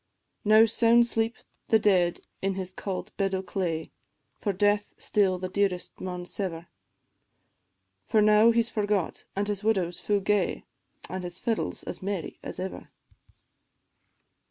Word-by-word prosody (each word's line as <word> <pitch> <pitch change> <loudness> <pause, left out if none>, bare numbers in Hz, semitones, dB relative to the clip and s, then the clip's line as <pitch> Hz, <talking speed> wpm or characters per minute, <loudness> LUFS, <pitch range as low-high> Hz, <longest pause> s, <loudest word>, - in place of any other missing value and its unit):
Now 215 +1 +7
sound 230 +1 +4
sleep 225 -1 0 0.3
the 220 - +5
dead 185 -5 +2 0.2
in 195 0 0
his 185 -1 -5
cauld 190 -1 -5
bed 195 -1 +1
o' 190 - -2
clay, 175 -4 -3 0.5
For 205 - 0
death 205 +2 +1
still 195 -3 +2
the 185 +1 -4
dearest 185 -1 -1
maun 180 -1 -4
sever; 175 -3 -4 1.4
For 220 - +3
now 215 +2 +6
he 235 0 +4
's 230 - -4
forgot, 205 -4 -1
an' 200 +1 0
his 205 -1 -3
widow's 190 -6 +1
fu' 205 -1 +1
gay, 200 -1 0 0.4
An' 185 +3 -4
his 175 -1 -7
fiddle 230 0 -1
's - - -8
as - - -6
merry 195 -3 -4
as - - -7
ever. 190 +1 -6
200 Hz, 150 wpm, -27 LUFS, 185-215 Hz, 1.4 s, Now